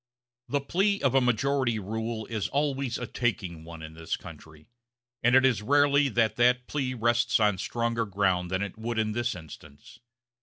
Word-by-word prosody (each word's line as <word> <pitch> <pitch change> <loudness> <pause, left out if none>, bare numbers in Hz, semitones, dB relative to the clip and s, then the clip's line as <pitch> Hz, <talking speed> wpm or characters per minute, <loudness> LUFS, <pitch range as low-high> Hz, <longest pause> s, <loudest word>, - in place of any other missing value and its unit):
The 145 +2 0
plea 195 +8 +1
of 135 -3 +3
majority 125 0 +1
rule 110 +2 -4
is 110 -6 -3
always 140 - -1
a 120 - -4
taking 100 -8 -2
one 80 -1 -10
in 80 0 -9
this 80 0 -4
country; 80 -1 -13 0.6
and 120 +2 +4
it 130 0 +6
is 120 -6 +2
rarely 145 +3 +3
that 115 -1 +1
that 125 +1 +3
plea 130 -3 -2
rests 120 +1 +2
on 105 -3 +2
stronger 115 +1 -1
ground 95 -3 0
than 95 +2 -1
it 100 +2 -7
would 115 +1 -3
in 110 -1 +1
this 120 0 -1
instance. 75 -3 -13
115 Hz, 175 wpm, -27 LUFS, 100-130 Hz, 0.6 s, it